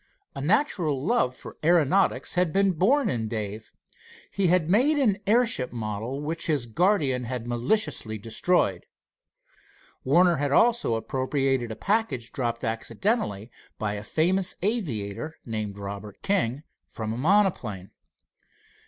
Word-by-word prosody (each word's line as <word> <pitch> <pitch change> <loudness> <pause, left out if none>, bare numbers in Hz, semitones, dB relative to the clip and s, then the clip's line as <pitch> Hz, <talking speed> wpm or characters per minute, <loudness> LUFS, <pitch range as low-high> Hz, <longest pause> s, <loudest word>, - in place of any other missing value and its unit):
A - - -5
natural 160 - +1
love 195 - +1
for - - -11
aeronautics 175 +3 +3
had 180 -2 +1
been 195 +1 +3
born 225 - +2
in 115 - -1
Dave. 110 -1 -5 0.6
He 195 -2 +1
had 175 -2 +2
made 255 - +3
an 225 -9 +2
airship 230 - +3
model 115 +4 -4
which 160 +3 -3
his 145 -6 +1
guardian 135 - +1
had 120 -1 -4
maliciously 120 - 0
destroyed. 110 - 0 1.2
Warner 170 +5 +4
had 140 0 -1
also 235 - +3
appropriated 130 0 -1
a - - -5
package 175 - -1
dropped 120 -4 -3
accidentally 115 - -2 0.3
by 105 -1 -2
a 105 0 -5
famous 180 - +1
aviator, 155 - -2
named 110 -3 -4
Robert 100 0 -8
King, 155 - 0 0.2
from 110 -1 -5
a - - -5
monoplane. 135 - +1
140 Hz, 125 wpm, -26 LUFS, 115-190 Hz, 1.2 s, Warner